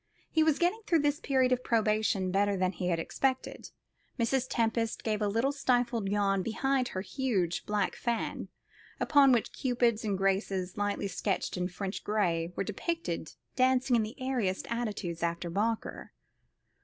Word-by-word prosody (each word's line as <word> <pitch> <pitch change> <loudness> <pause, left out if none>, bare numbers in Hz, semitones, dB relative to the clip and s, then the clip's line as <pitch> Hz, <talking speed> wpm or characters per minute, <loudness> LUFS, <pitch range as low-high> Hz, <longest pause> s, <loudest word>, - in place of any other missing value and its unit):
He 320 - +3
was 315 -2 +3
getting 360 +6 +1
through 330 -3 +3
this 290 +1 +1
period 260 -4 +2
of 250 0 +1
probation 215 -4 +1
better 200 +1 +2
than 185 0 +1
he 180 0 -4
had 170 -2 +1
expected. 260 +10 -2 0.5
Mrs. 255 +2 +1
Tempest 230 -1 0
gave 215 -1 -1
a 210 - +2
little 230 +7 +1
stifled 245 -6 +1
yawn 200 -1 +2
behind 260 +5 0
her 185 - -4
huge 200 -6 -1
black 210 -2 0
fan, 235 -1 -2 0.5
upon 280 -2 +5
which 235 -3 +1
Cupids 240 -3 +1
and 205 -3 0
Graces, 190 -1 0
lightly 205 -1 -1
sketched 195 0 -2
in 180 0 -1
French 190 +2 -5
gray, 175 -6 0
were - - -1
depicted 335 - -3 0.2
dancing 255 -1 +3
in 230 - +4
the 220 +6 -5
airiest 245 -8 -1
attitudes, 210 -8 -3
after 170 0 -2
Boucher. 220 +5 -2
220 Hz, 155 wpm, -30 LUFS, 195-255 Hz, 0.5 s, upon